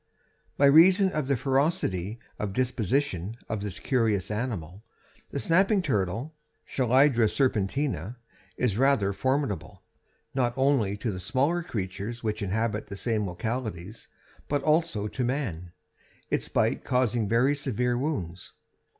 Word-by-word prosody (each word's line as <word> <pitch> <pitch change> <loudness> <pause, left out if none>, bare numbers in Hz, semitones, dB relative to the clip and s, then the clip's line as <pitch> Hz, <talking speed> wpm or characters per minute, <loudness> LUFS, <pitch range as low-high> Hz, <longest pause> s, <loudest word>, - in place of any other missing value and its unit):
By 140 - +5
reason 185 +7 +6
of 150 -5 -2
the 140 -2 +2
ferocity 125 - 0 0.2
of 105 -2 -3
disposition 120 - -1
of 110 -2 -3
this 100 -2 -5
curious 110 -7 0
animal, 105 -5 -4 0.5
the - - -5
snapping 195 - +3
turtle 115 - -1 0.3
(Chelydra 130 -2 +3
serpentina) 115 - -1 0.4
is 115 -4 0
rather 130 -8 +3
formidable, 130 -1 -2 0.5
not 120 -2 0
only 130 -7 +2
to 110 +2 -2
the 95 - -5
smaller 135 - +1
creatures 105 - -5
which 110 0 -2
inhabit 105 +2 -1
the 100 - -7
same 110 -2 -1
localities, 105 0 -5 0.4
but 145 -1 -1
also 155 -9 +1
to 125 +4 -3
man, 115 - -3 0.6
its - - -1
bite - - +1
causing 120 -4 +1
very 125 +5 +3
severe 125 -3 -1
wounds. 95 - -4
120 Hz, 125 wpm, -27 LUFS, 100-140 Hz, 0.6 s, reason